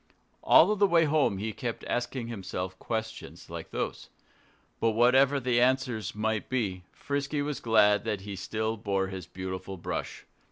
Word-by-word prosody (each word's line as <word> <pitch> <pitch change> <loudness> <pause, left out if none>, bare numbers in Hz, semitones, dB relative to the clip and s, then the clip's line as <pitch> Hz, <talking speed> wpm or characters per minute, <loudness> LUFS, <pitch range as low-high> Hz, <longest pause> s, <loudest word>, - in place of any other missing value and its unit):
All 200 +6 +6
the 200 0 +4
way 170 -3 +4
home 145 -9 +2
he 110 +2 -3
kept 120 -1 -4
asking 120 0 -2
himself 95 -4 -5
questions 110 -1 -5
like - - -7
those. - - -4 0.7
But 115 -1 +2
whatever 130 +4 +4
the 120 -2 +2
answers 125 -4 +1
might 110 0 -1
be, 100 -8 -2
Frisky 145 +1 -2
was 145 -1 -3
glad 105 -3 +4
that 105 -3 -2
he 100 0 -6
still 110 +4 -2
bore 100 -2 0
that 95 -3 -8
beautiful 95 +1 -5
brush. 85 - -5
110 Hz, 155 wpm, -28 LUFS, 100-130 Hz, 0.7 s, All